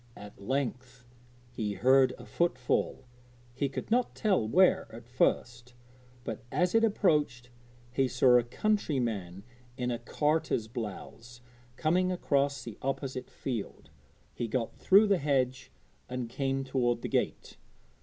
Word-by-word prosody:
At 105 -1 -12
length 125 +1 -3 0.5
he 110 -4 -3
heard 130 +6 +4
a - - -11
footfall. 130 -5 -1 0.5
He 140 +2 -1
could 140 - -6
not 245 +1 +1
tell 190 - +1
where 185 +10 +4
at 115 +1 -11
first, 120 0 -1 0.5
but, 115 -4 -5
as 180 0 +1
it 225 0 +4
approached, 150 - +1 0.4
he 130 +2 +1
saw 125 -1 +5
a - - -1
countryman 120 - -1 0.3
in 125 -1 -1
a 120 - -2
carter's 150 -1 0
blouse 115 +2 -8 0.3
coming 180 +6 +1
across 140 -6 0
the 115 -3 -9
opposite 135 -1 -3
field. 110 - -6 0.4
He 120 - -3
got 115 +1 -2
through 200 +3 +5
the 200 -3 +2
hedge 130 -3 0 0.4
and 125 -1 -3
came 135 +2 -2
toward 125 -3 0
the - - -1
gate. - - -2
130 Hz, 135 wpm, -30 LUFS, 120-145 Hz, 0.5 s, saw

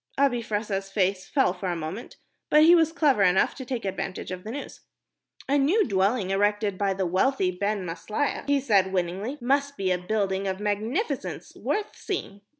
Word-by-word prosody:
Abi 270 -3 +2
Fressah's 205 -3 -3
face 195 -1 0
fell 265 -10 +2
for 185 0 -4
a 175 - -1
moment, 165 +8 -6 0.3
but 300 +1 +6
he 335 +2 +8
was 325 -2 +4
clever 295 -9 +2
enough 185 -1 +4
to 265 - -8
take 250 -4 -4
advantage 190 -1 -4
of 180 0 -6
the 215 - -7
news. 280 +5 -7 0.7
"A 285 +2 +3
new 350 +11 +3
dwelling 195 0 +1
erected 205 +1 +1
by 195 0 0
the 190 0 -1
wealthy 185 +3 +1
Ben 200 +1 -2
Maslia," 180 - -2
he 285 0 +3
said, 200 -8 +2
winningly, 190 +9 -2
"must 280 +3 0
be 190 -1 0
a 180 - +1
building 195 0 -1
of 190 0 -2
magnificence, 215 - -2
worth 425 0 -2
seeing." 205 - -5
205 Hz, 180 wpm, -26 LUFS, 190-270 Hz, 0.7 s, he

